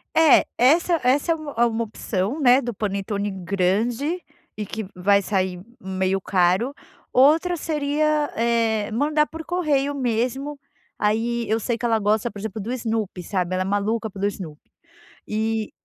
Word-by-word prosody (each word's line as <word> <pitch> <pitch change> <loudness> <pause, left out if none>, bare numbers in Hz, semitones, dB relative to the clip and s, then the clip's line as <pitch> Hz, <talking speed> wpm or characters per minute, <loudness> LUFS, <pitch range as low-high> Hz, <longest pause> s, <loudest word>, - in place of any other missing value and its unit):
É, 320 -2 +6
essa 325 +6 +4
essa 275 +6 +2
é - - +3
uma, 310 -3 -7
é 240 - +5
uma 230 0 0
opção, 210 +3 -3
né, 260 -1 +5
do 240 -2 -4
panetone 200 0 -2
grande 200 - -1 0.4
e 210 - -3
que 220 +2 -5
vai 200 +2 +3
sair 185 -2 -1 0.2
meio 190 0 -1
caro. 190 +7 +1 0.4
Outra 315 +7 +4
seria, 300 -1 0
eh, 225 -2 +1
mandar 300 +6 +2
por 325 0 -8
correio 290 -6 0
mesmo. 260 +3 -1 0.4
Aí 230 +2 0
eu 220 - +2
sei 230 +1 -1
que 240 - -4
ela 230 -1 +3
gosta, 215 +3 +1
por 205 - -10
exemplo, 215 +1 -5
do 220 +5 -4
Snoopy, 220 -6 -3
sabe, 180 0 -2
ela 185 - 0
é - - -5
maluca 210 +3 -1
pelo 200 0 -4
Snoopy, 170 -7 -8 0.6
e 220 0 -1
225 Hz, 160 wpm, -23 LUFS, 200-280 Hz, 0.6 s, É